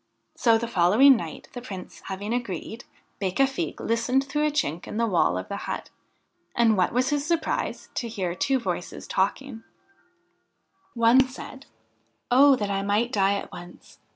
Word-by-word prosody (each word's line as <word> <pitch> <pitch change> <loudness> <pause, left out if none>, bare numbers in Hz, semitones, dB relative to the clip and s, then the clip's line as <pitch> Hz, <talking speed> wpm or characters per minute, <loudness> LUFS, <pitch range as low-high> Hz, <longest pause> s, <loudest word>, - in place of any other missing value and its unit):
So 230 -2 +4
the 235 +1 -3
following 220 +8 +5
night, 165 -9 -6
the 245 - -6
Prince 195 -7 -9
having 200 +3 -4
agreed, 230 -1 -4 0.3
Becafigue 265 +8 -1
listened 240 +4 +1
through 295 +2 0
a - - +2
chink 175 - -2
in - - -5
the 230 - +2
wall 175 - +2
of 95 - -5
the - - -4
hut, - - -5 0.6
and 230 -2 +4
what 185 -2 +2
was 255 +2 +1
his 290 -1 0
surprise 330 +1 -2
to 235 - -3
hear 190 -6 -3
two 265 +9 +1
voices 180 -7 -4
talking 225 +5 -2
I - - -31 1.3
One 235 +3 +5
said: 260 +1 -10 0.6
'Oh, 275 +2 +7
that 205 -4 -3
I 195 0 0
might 210 +5 0
die 200 -3 +2
at 200 - -6
once! 175 0 -12
230 Hz, 165 wpm, -25 LUFS, 195-260 Hz, 1.3 s, Oh